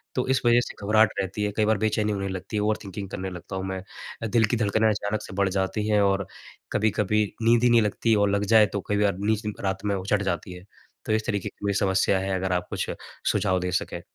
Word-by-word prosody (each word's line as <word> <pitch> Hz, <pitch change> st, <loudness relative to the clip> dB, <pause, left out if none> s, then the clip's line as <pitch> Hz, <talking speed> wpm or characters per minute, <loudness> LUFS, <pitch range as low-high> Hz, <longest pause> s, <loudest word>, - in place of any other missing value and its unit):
तो 125 Hz, -, 0 dB
इस 130 Hz, -, +2 dB
वजह 120 Hz, 0 st, +6 dB
से -, -, -7 dB
घबराहट 110 Hz, +1 st, +4 dB
रहती 95 Hz, +2 st, -2 dB
है। 105 Hz, -, 0 dB
कई 110 Hz, -, +3 dB
बार 110 Hz, 0 st, +2 dB
बेचैनी 110 Hz, -1 st, +1 dB
होने 100 Hz, -1 st, -2 dB
लगती 95 Hz, +3 st, -6 dB
है, -, -, +1 dB
ओवर-थिंकिंग 100 Hz, -2 st, -3 dB
करने 95 Hz, 0 st, -4 dB
लगता 90 Hz, +2 st, -8 dB
हूँ 95 Hz, -, -3 dB
मैं। 95 Hz, -1 st, -4 dB, 0.4 s
अ, -, -, 0 dB
दिल 115 Hz, 0 st, +3 dB
की 115 Hz, +2 st, -1 dB
धड़कनें 110 Hz, 0 st, +2 dB
अचानक 105 Hz, 0 st, -1 dB
से -, -, -9 dB
बढ़ 100 Hz, -1 st, +2 dB
जाती 95 Hz, +3 st, -1 dB
हैं 105 Hz, -1 st, +4 dB
और 100 Hz, -1 st, +1 dB, 0.5 s
कभी-कभी 105 Hz, 0 st, +2 dB, 0.2 s
नींद 115 Hz, +1 st, +4 dB
ही 125 Hz, -, +5 dB
नहीं 115 Hz, -1 st, +6 dB
लगती 110 Hz, +2 st, +1 dB
और 100 Hz, -1 st, +3 dB
लग 100 Hz, +1 st, 0 dB
जाए 110 Hz, -1 st, +8 dB
तो 100 Hz, -, -1 dB
कई 105 Hz, -, +1 dB
बार 100 Hz, -2 st, +1 dB
नींद 105 Hz, 0 st, -1 dB
रात 95 Hz, 0 st, -2 dB
में 100 Hz, -1 st, +1 dB
उचट 100 Hz, +2 st, 0 dB
जाती 90 Hz, 0 st, -3 dB
है। 90 Hz, -, -11 dB, 0.4 s
तो -, -, 0 dB
इस 110 Hz, 0 st, 0 dB
तरीके 100 Hz, -3 st, -1 dB
की 100 Hz, -, -10 dB
मेरी 100 Hz, -, 0 dB
समस्या 95 Hz, 0 st, +2 dB
है, 95 Hz, 0 st, -1 dB
अगर 95 Hz, 0 st, -2 dB
आप 90 Hz, 0 st, -1 dB
कुछ -, -, -2 dB, 0.4 s
सुझाव 95 Hz, 0 st, +1 dB
दे 90 Hz, 0 st, -2 dB
सकें। 95 Hz, -, -2 dB
100 Hz, 245 wpm, -25 LUFS, 95-110 Hz, 0.5 s, जाए